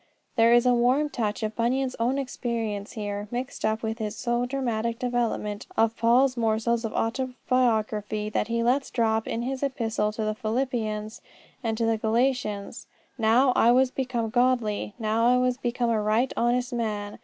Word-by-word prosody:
There 230 -1 +5
is 240 +1 +5
a 250 - +5
warm 255 +5 +2
touch 220 -2 -2
of 215 0 -2
Bunyan's 255 +3 0
own 245 +4 +1
experience 230 -6 -3
here, 205 -2 -4
mixed 250 +3 -5
up 220 +1 0
with 220 +1 -3
his 215 -1 -3
so 240 +1 -1
dramatic 235 -3 -2
development 240 -4 -2
of 225 0 +3
Paul's 250 +3 +3
morsels 230 0 0
of 225 - -3
autobiography 225 -4 0
that 215 - -1
he 230 0 0
lets 260 +4 +1
drop 225 -2 0
in 230 - -2
his 265 +1 -3
Epistles 225 -6 -1
to 220 - -2
the 215 0 0
Philippians 220 -2 -2 0.4
and 225 -1 -1
to 230 - 0
the 225 -1 +1
Galatians. 225 -2 -1 0.3
"Now 240 +4 +4 0.2
was 260 0 +3
I - - -38
become 245 -4 -2
godly; 240 -4 +1
now 225 0 +1
I 250 +1 +5
was 250 0 +1
become 240 -2 -1
a 220 -2 +1
right 220 +5 +1
honest 245 +2 0
man. 210 -3 -3
235 Hz, 170 wpm, -26 LUFS, 220-250 Hz, 0.4 s, There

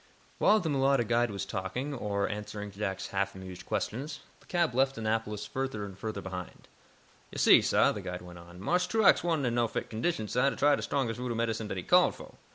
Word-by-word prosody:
While 215 - +5
the 180 - -3
mulatto 135 -2 +3
guide 120 +1 +2
was 100 -1 -4
talking, 105 +10 -3
or 100 -5 -1
answering 105 -1 -5
Jack's 95 -1 -4
half 100 0 -1
amused 95 -1 -9
questions, 140 +6 -3 0.2
the - - -24
cab 170 -6 +1
left 135 +1 +2
Annapolis 110 -1 -2
further 130 -6 -3
and 95 -2 -9
further 105 +1 -5
behind. 90 -2 -7 0.6
"Yo' - - -8
see, - - +7
sah," - - +3
the - - -5
guide 90 0 -6
went 90 -1 -11
on, 85 +1 -13
"Marse 180 - +1
Truax 220 +1 +4
wa'n't 165 -5 +1
in 120 - 0
no 120 -1 +2
fit - - -4
condition, 110 0 -1
sah, 125 +5 +2
to - - -5
try 145 0 +4
de - - -5
strongest 120 -4 -1
voodoo 125 -2 -2
medicine 115 -1 -1
dat 95 - -4
he 90 - -4
called - - +4
fo'. - - -12
115 Hz, 215 wpm, -30 LUFS, 100-135 Hz, 0.6 s, see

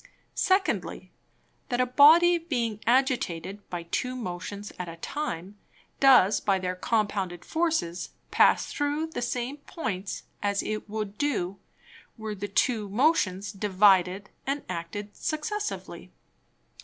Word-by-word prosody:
Secondly, 380 0 0 0.6
That 245 - -1
a 255 - +4
Body 320 +7 +7
being 240 -10 -2
agitated 210 -7 0
by 175 -1 -4
two 250 +9 -2
Motions 200 -1 -6
at 180 -1 -4
a 165 - -8
time, 195 - -5 0.4
does 255 -7 +6
by 195 -2 +1
their 185 -1 -2
compounded 195 -4 -1
Forces 320 - -1 0.2
pass - - +5
through 295 +2 -1
the - - -4
same 245 +3 -2
Points, 220 - -5 0.2
as 200 -1 0
it 215 0 -4
would 210 -1 -4
do, 200 -10 -1 0.6
were 220 -1 -4
the 205 0 -5
two 210 +1 +1
Motions 205 - +1
divided 195 -1 +3 0.2
and 280 +1 -1
acted 205 +5 -6
successively. 415 +8 -4
215 Hz, 120 wpm, -27 LUFS, 190-280 Hz, 0.6 s, Body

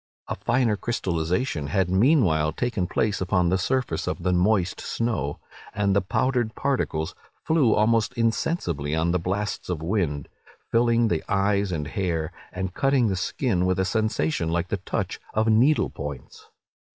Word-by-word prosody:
A - - -2
finer 120 -3 +1
crystallization 90 - -1
had 95 +5 +1
meanwhile 95 - +3
taken 110 -6 -1
place 105 +1 0
upon 90 -1 +2
the 95 +1 +1
surface 130 +7 -1
of - - -3
the 90 0 +1
moist 90 0 +1
snow; 105 - -2 0.4
and 100 -2 +1
the 100 - +4
powdered 120 +3 0
particles 125 - -1 0.3
flew 150 -8 +3
almost 115 +2 +2
insensibly 110 - 0
on 80 +1 +1
the 90 - +1
blasts 100 +5 -3
of 85 -3 -3
wind, 80 -7 -1 0.4
filling 115 0 +3
the 85 -7 -1
eyes 100 0 +1
and 75 -4 -2
hair, 85 -5 -2 0.2
and 95 0 -4
cutting 135 -3 +2
the 95 - 0
skin 90 +1 0
with 95 - +1
a 95 - +1
sensation 90 -7 0
like 85 +2 -1
the 100 - 0
touch 95 - -3 0.2
of 110 +1 +2
needle 125 +8 +3
points. 70 -3 -8
95 Hz, 155 wpm, -25 LUFS, 85-115 Hz, 0.4 s, the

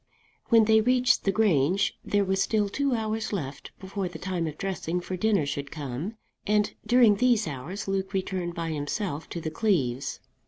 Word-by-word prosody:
When 230 -2 +6
they 220 0 +5
reached 250 +2 +3
the 195 - +3
Grange 195 -1 +2
there 205 -1 +1
were 190 0 +1
still 205 +1 +1
two 275 +3 0
hours 220 0 -2
left 145 -9 -5
before 190 0 -4
the 175 - -8
time 180 -1 -2
of 155 -1 -6
dressing 180 -3 -2
for 185 +1 -5
dinner 200 -3 +2
should 140 0 -4
come, 145 - -5 0.3
and 210 0 +2
during 240 -4 +6
these 235 -4 +3
hours 155 +9 -5
Luke 195 0 -1
returned 185 -3 -2
by 165 -1 -3
himself 155 +2 -3
to 170 - -4
the 155 -1 -4
Cleeves. 140 - 0
190 Hz, 180 wpm, -27 LUFS, 160-215 Hz, 0.3 s, When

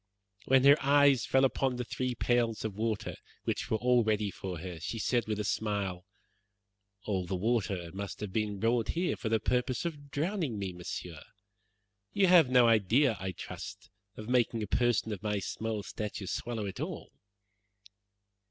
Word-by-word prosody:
When 130 0 +4
her 140 +2 +6
eyes 140 -2 +4
fell 135 0 +4
upon 130 -1 0
the 125 - -3
three 125 +1 -3
pails 120 -3 +1
of 110 - -2
water, 110 0 -2 0.3
which - - -2
were 110 - +2
all 125 0 +3
ready 105 -2 0
for 95 -1 -6
her, 85 0 -7
she 100 +8 -4
said 115 +1 0
with 105 -1 -2
a - - 0
smile, 100 -3 -2 1.0
"All 95 -4 -2
that 95 - -2
water 95 -3 0
must 100 0 -6
have 100 -3 -5
been 105 -2 -1
brought 115 +1 +1
here 175 +1 +1
for 110 - -4
the 110 0 +2
purpose 125 +6 0
of 145 -4 -5
drowning 155 - -2
me, 95 -2 -3
Monsieur. 90 -2 -6 0.9
You 200 - +4
have 175 -7 +6
no 125 -2 +6
idea, 115 +4 +4
I 95 0 -3
trust, - - -9 0.3
of 110 - -7
making 120 -2 +1
a - - -4
person 120 -1 +1
of 95 - -7
my 105 -1 -1
small 110 +2 -3
stature 105 -1 -5
swallow 115 +2 -3
it 95 -2 -6
all."' - - -5
110 Hz, 170 wpm, -31 LUFS, 100-125 Hz, 1.0 s, her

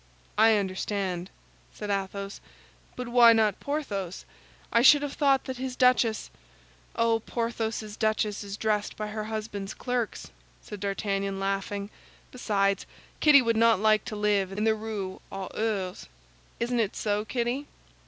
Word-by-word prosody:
"I 220 +1 +6
understand," 190 -2 -2 0.5
said 210 -1 -4
Athos; 195 0 -3 0.5
"but 250 -1 -5
why 240 -1 +7
not 215 -3 +2
Porthos? 205 - -4 0.5
I 235 - +5
should 290 +3 +7
have 285 -1 -3
thought 275 -3 +3
that 260 -1 -5
his 255 0 -4
duchess—" 250 -4 +2 0.6
"Oh, 230 -1 +2
Porthos's 225 -2 -3
duchess 215 -2 0
is 200 0 -6
dressed 210 -1 -1
by 215 0 -4
her 215 0 -4
husband's 215 -2 -5
clerks," 245 -4 -3 0.3
said 210 - -9
D'Artagnan, 195 0 -2
laughing. 195 +1 -2 0.4
"Besides, 200 -5 0 0.3
Kitty 285 -3 +7
would 230 -1 +1
not 230 -3 +5
like 215 0 +3
to 220 - -5
live 205 -2 +1
in 205 +2 -2
the 220 0 +4
Rue 215 -3 -5
aux 195 -1 -5
Ours. 200 -4 -2 0.5
Isn't 240 +1 0
it 215 -3 0
so, 210 0 0
Kitty?" 245 +5 -2
215 Hz, 145 wpm, -27 LUFS, 200-235 Hz, 0.6 s, why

